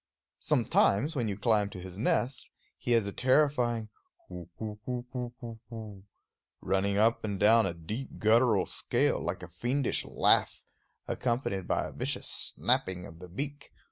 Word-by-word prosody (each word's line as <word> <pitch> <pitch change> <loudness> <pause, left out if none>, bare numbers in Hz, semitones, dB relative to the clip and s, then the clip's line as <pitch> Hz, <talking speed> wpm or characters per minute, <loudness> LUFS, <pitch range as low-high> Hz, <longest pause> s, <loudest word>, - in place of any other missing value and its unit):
Sometimes, 140 +12 +2
when 120 -5 0
you 100 -2 -3
climb 105 -2 +2
to 95 - -9
his 90 0 -9
nest, 120 +4 -1 0.3
he 120 - 0
has 115 -3 +3
a 100 - -3
terrifying 125 -3 +2 0.4
hoo 90 -1 -8
hoo 105 -1 -6
hoo 125 -1 -4
hoo 125 -1 -4
hoo 115 -2 -8
hoo, 105 -4 -9 0.5
running 100 +1 0
up 115 +2 +3
and 100 -3 -3
down 110 +3 +5
a - - -3
deep 105 +11 -6
guttural 110 -2 +4
scale, - - +1
like - - -3
a - - -7
fiendish 120 +10 -1
laugh, - - +2 0.4
accompanied 120 -7 -2
by - - 0
a - - -9
vicious - - -2 0.3
snapping 90 -1 0
of 80 - -12
the 90 0 -10
beak. 140 - -5
110 Hz, 160 wpm, -30 LUFS, 100-125 Hz, 0.5 s, down